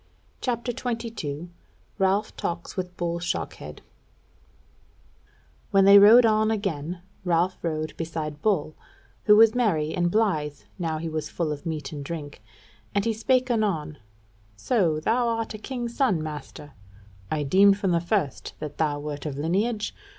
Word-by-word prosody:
CHAPTER 245 -1 -2
22 225 - -4 0.5
Ralph 195 +2 +1
Talks 170 0 -4
With 180 -1 -5
Bull 170 -1 -2
Shockhead 175 - -4 1.9
When 195 -1 +4
they 200 +1 +9
rode 225 +4 +8
on 215 0 +3
again, 175 -5 -3 0.2
Ralph 180 +1 +1
rode 155 -2 -3
beside 155 -2 -4
Bull, 165 -8 0 0.5
who 210 - +7
was 220 0 +7
merry 165 -11 +1
and 175 -1 +1
blithe 165 -9 0 0.2
now 165 -3 -1
he 165 +1 -4
was 155 -1 -3
full 165 -3 -2
of 150 +3 -6
meat 155 -4 -4
and 145 -2 -6
drink; 145 -5 -7 0.5
and 200 - +1
he 230 - +1
spake 255 +3 +1
anon: 165 -10 -1 0.6
"So 165 - +1
thou 235 +9 +1
art 225 -1 -2
a 215 - -7
king's 240 0 -5
son, 195 - +2
master? 150 -1 -8 0.6
I 150 -1 -1
deemed 195 +7 +5
from 195 -3 0
the 170 -1 +2
first 175 -6 -2
that 150 -1 -7
thou 150 -2 +1
wert 145 0 -5
of 140 -2 -5
lineage. 205 +8 -1
175 Hz, 150 wpm, -25 LUFS, 155-215 Hz, 1.9 s, they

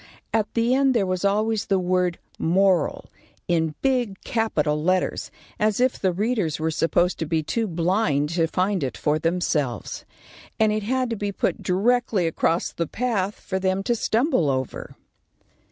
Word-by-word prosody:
At 220 -2 +1
the 235 +2 +2
end 270 -1 +3
there 210 -4 +3
was 185 0 -2
always 215 +1 +1
the 195 - +2
word 180 -1 +1 0.2
MORAL, 185 -1 +2 0.4
in 160 -3 +1
big 245 -7 0
capital 150 -10 0
letters, 185 +3 0 0.3
as 215 0 +1
if 255 0 +2
the 190 - +1
readers 200 -4 -1
were 160 +1 0
supposed 175 +3 +1
to 160 - -2
be 160 0 0
too 225 +8 -1
blind 170 -4 +1
to 165 0 +1
find 185 0 0
it 130 - -3
for 150 +1 +1
themselves, 155 - -1 0.6
and 220 -1 +4
it 215 0 0
had 255 +3 -1
to - - 0
be 205 -1 -3
put - - -1
directly 215 0 +1
across 165 +1 0
the 170 - -3
path 210 -3 -1
for 190 -1 -3
them 190 +1 0
to 240 - +1
stumble 230 - +1
over. 130 -1 -3
190 Hz, 165 wpm, -24 LUFS, 165-220 Hz, 0.6 s, and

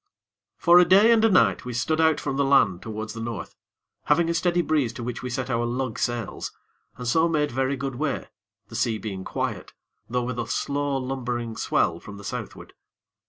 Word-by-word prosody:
For 175 +1 +6
a - - +8
day 205 +5 +7
and 225 -1 +4
a 225 - +6
night 115 - +3
we 125 - -5
stood 155 +7 +1
out 160 -1 +3
from 135 - -3
the 140 - +2
land 135 -10 +3
towards 110 0 -5
the 115 - -6
North, 115 -7 -5 0.5
having 165 +3 +3
a - - 0
steady 175 +1 +1
breeze 150 -8 +1
to 120 - -7
which 120 0 -4
we 125 - -4
set 125 0 -3
our 120 -2 0
lug 125 0 -2
sails, 120 -3 -3 0.5
and 125 - -5
so 160 +6 +3
made 150 -3 +1
very 135 +2 0
good 135 0 -3
way, 140 +3 -2 0.4
the 115 - -9
sea 115 -1 0
being 100 -3 -5
quiet, - - -4 0.4
though 125 +1 0
with 125 0 -3
a 115 - -2
slow, 140 -1 -1
lumbering 125 -3 -3
swell 85 -5 +1
from 100 +2 -10
the 100 - -11
Southward. - - -7
125 Hz, 205 wpm, -25 LUFS, 115-150 Hz, 0.5 s, a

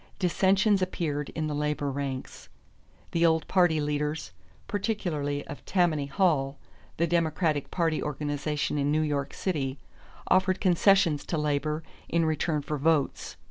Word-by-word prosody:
Dissensions 195 +2 +3
appeared 155 -6 -2
in 160 - -1
the 150 - -2
labor 145 -1 -1
ranks. 135 -1 -5 0.6
The 170 - +1
old 160 -2 +3
party 175 -4 +3
leaders, 150 +1 -2 0.4
particularly 175 -9 -2
of 145 - -9
Tammany 165 -6 +1
Hall, 140 -3 +1 0.4
the 170 - +2
Democratic 160 -3 0
party 165 -3 0
organization 150 0 -2
in 140 +1 +1
New 155 +1 +2
York 145 -2 -1
City, 140 -7 -2 0.5
offered 185 0 +3
concessions 180 -4 +4
to 165 - -1
labor 150 +1 -1 0.3
in 170 0 +2
return 155 -1 0
for 150 +1 -3
votes. 155 -1 0
155 Hz, 135 wpm, -28 LUFS, 145-175 Hz, 0.6 s, concessions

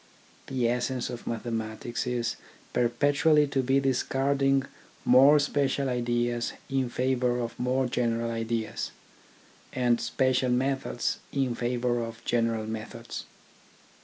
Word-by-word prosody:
The 125 -3 0
essence 125 +1 -1
of 120 - -7
mathe 115 -2 -3
matics 110 +2 -3
is 120 -2 -1 0.4
perpetually 145 +5 +3
to 140 -1 0
be 135 +2 +3
discarding 135 +1 +1 0.4
more 135 +4 +7
special 140 -1 +1
ideas 120 -1 0 0.2
in 135 -2 +1
favour 125 -1 +1
of 115 -1 -4
more 130 +1 +1
general 115 -1 0
ideas, 115 -1 -2 0.8
and 120 -2 +2
special 130 +2 +1
methods 130 0 0
in 135 -3 0
favour 120 0 0
of 115 0 -8
general 115 -2 +1
methods. 110 +1 -6
125 Hz, 115 wpm, -28 LUFS, 115-135 Hz, 0.8 s, more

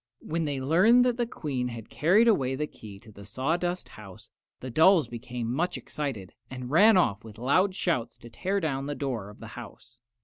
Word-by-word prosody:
When 165 +1 -2
they 145 -2 -2
learned 190 - +4
that 245 -1 +1
the 240 -1 0
Queen 135 - -3
had 115 -2 -8
carried 180 - +4
away 135 - +2
the 150 +3 -2
key 105 -8 -12
to 110 - -15
the 100 -1 -13
sawdust 165 - -2
house 100 -4 -13 0.3
the 130 - -7
dolls 160 +4 +5
became 120 0 -5
much 175 +6 -1
excited 125 -11 -5 0.2
and 125 -1 -7
ran 200 +6 +6
off 105 - +1
with 110 -1 -12
loud 185 - +2
shouts 160 -12 -1
to 120 - -13
tear 190 +11 -1
down 140 -5 -2
the 145 - -3
door 120 -8 -4
of 105 - -14
the 115 - -10
house. 120 0 -12
135 Hz, 200 wpm, -27 LUFS, 115-175 Hz, 0.3 s, ran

